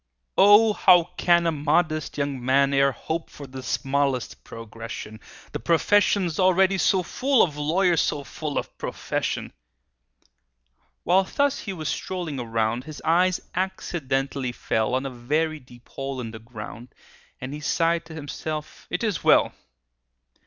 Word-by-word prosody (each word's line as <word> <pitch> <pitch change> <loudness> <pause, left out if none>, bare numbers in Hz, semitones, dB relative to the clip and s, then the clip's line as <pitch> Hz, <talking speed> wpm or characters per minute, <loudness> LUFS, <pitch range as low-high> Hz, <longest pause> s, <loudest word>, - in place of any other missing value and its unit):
"O, 210 +2 +7
how 180 -3 +5
can 170 -1 +3
a 165 - +3
modest 155 +1 0
young 140 -3 -2
man 135 +2 +3
E'er 140 0 +4
hope 160 +5 -4
for 145 - -10
the 130 0 -8
smallest 135 -1 -1
progression,— 115 -1 -8 0.3
The - - -4
profession's 175 - +2
already 190 +1 +4
so 185 0 +3
full 265 +7 +2
Of 155 -5 -1
lawyers 170 +4 +2
so 145 - -1
full 150 +1 -5
of - - -4
profession!" - - -3 1.5
While 190 +3 +3
thus 285 +6 0
he 200 - -5
was 155 -4 -5
strolling 175 -7 -4
around, 115 +1 -1
His 155 -1 -8
eye 180 +3 +4 0.2
accidentally 135 -8 -2
fell 110 0 -1
On 130 +1 -1
a 135 - -4
very 150 +6 -1
deep 125 -2 -18
hole 135 -1 -5
in 115 -3 -5
the 110 - -9
ground, 115 +1 -10 0.4
And 130 +2 -6
he 150 - -5
sighed 165 +2 +1
to 160 0 -10
himself, 155 0 -6
"It 180 - -2
is 215 -5 -1
well!" - - +4
150 Hz, 145 wpm, -24 LUFS, 130-175 Hz, 1.5 s, O